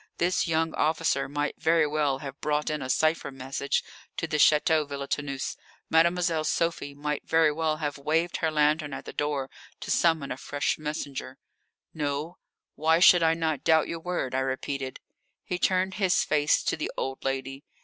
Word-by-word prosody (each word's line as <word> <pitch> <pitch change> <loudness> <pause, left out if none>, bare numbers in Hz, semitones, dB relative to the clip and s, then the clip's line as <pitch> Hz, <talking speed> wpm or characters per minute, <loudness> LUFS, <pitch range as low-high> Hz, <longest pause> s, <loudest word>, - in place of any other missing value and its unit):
This 175 +1 +1
young 160 0 0
officer 160 -2 +1
might 145 +1 -3
very 165 -1 +4
well 145 -2 0
have 135 +1 -8
brought 150 0 0
in 150 -1 -3
a 130 - -5
cipher 155 +4 +1
message 135 +1 -2 0.3
to - - -1
the 150 - -1
Château 150 0 +4
Villetaneuse. 140 -1 -3 0.4
Mademoiselle 170 0 +3
Sophie 155 -3 -1
might 150 0 -3
very 160 -1 +4
well 155 0 -1
have 145 -2 -3
waved 160 +4 0
her 160 - 0
lantern 150 -1 +1
at - - -7
the - - -8
door 145 -2 -1 0.3
to - - -5
summon 160 -5 +2
a 125 - -3
fresh 145 +2 -2
messenger. 145 -3 -5 0.6
"No; 150 +3 -3 0.3
why 160 +2 +3
should 175 0 +7
I 165 0 +3
not 160 -3 -1
doubt 160 -1 +4
your 165 - -4
word?" 170 -7 -3
I 130 - +1
repeated. 130 0 -3 0.4
He 180 - -3
turned 185 +1 +1
his 190 -2 +2
face 150 -1 +2
to - - 0
the 155 - -3
old 135 0 -3
lady. 135 +1 -3
150 Hz, 170 wpm, -27 LUFS, 140-165 Hz, 0.6 s, should